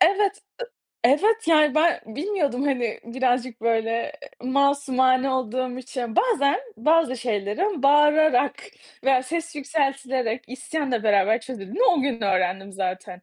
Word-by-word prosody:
Evet, 400 Hz, +2 st, +3 dB, 0.2 s
ı -, -, -2 dB, 0.4 s
evet, 415 Hz, -, +3 dB
yani, 305 Hz, -3 st, +4 dB
ben 335 Hz, +2 st, +3 dB
bilmiyordum. 285 Hz, -, -2 dB
Hani, 250 Hz, -6 st, -1 dB
birazcık, 250 Hz, 0 st, -1 dB
böyle, 225 Hz, -1 st, 0 dB, 0.5 s
eee, 255 Hz, -, -5 dB
masumane 270 Hz, -2 st, +2 dB
olduğum 255 Hz, 0 st, -2 dB
için. 250 Hz, -3 st, -6 dB
Bazen 395 Hz, -, +2 dB, 0.2 s
bazı 310 Hz, -4 st, +2 dB
şeylerin 235 Hz, -, -2 dB
bağırarak 295 Hz, -1 st, +4 dB, 0.5 s
veya 265 Hz, -1 st, +3 dB
ses 335 Hz, +4 st, -4 dB
yükseltilerek, 270 Hz, -5 st, -2 dB
isyanla 260 Hz, -1 st, -3 dB
beraber 210 Hz, +1 st, +3 dB
çözüldüğünü 225 Hz, -, -5 dB
o 360 Hz, -, +4 dB
gün 265 Hz, -4 st, -2 dB
öğrendim 190 Hz, 0 st, -1 dB
zaten. 185 Hz, -1 st, -5 dB
260 Hz, 125 wpm, -23 LUFS, 230-300 Hz, 0.5 s, yani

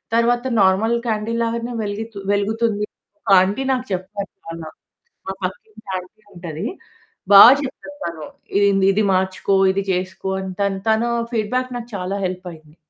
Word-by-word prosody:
తర్వాత 240 Hz, +1 st, +2 dB, 0.2 s
normal 195 Hz, +5 st, +3 dB
candle 225 Hz, +1 st, -1 dB
లాగానే 235 Hz, +1 st, -3 dB
వెలిగు 205 Hz, +2 st, -3 dB, 0.3 s
వెలుగుతుంది. 210 Hz, +1 st, 0 dB, 0.4 s
కా 195 Hz, -, +7 dB
ఆంటీ 200 Hz, +8 st, 0 dB
నాకు 255 Hz, 0 st, -2 dB
చెప్పారు 195 Hz, +2 st, -5 dB
చాలా. 165 Hz, -1 st, -7 dB, 0.6 s
మా 190 Hz, -, -2 dB
పక్కింటి 215 Hz, +4 st, -7 dB
ఆంటీ 185 Hz, +4 st, -11 dB
ఉంటది. 170 Hz, +2 st, -5 dB, 0.6 s
బా 200 Hz, -, +11 dB, 0.2 s
చెప్తది 290 Hz, +1 st, -7 dB
తను. 170 Hz, -2 st, -5 dB, 0.3 s
"ఇది 200 Hz, -, +4 dB
ఇది 195 Hz, 0 st, +3 dB
ఇది 215 Hz, +2 st, +2 dB
మార్చుకో, 190 Hz, +1 st, 0 dB, 0.2 s
ఇది 195 Hz, +1 st, -1 dB
చేసుకో" 185 Hz, +1 st, -3 dB
అని 190 Hz, 0 st, -5 dB
తను, 200 Hz, -1 st, 0 dB
తను 220 Hz, +2 st, +2 dB, 0.2 s
ఫీడ్‌బ్యాక్ 250 Hz, +4 st, -1 dB
నాకు 235 Hz, 0 st, -8 dB
చాలా 190 Hz, +1 st, -3 dB
హెల్ప్ 185 Hz, 0 st, -4 dB
అయింది. 155 Hz, -2 st, -16 dB
200 Hz, 150 wpm, -20 LUFS, 185-225 Hz, 0.6 s, బా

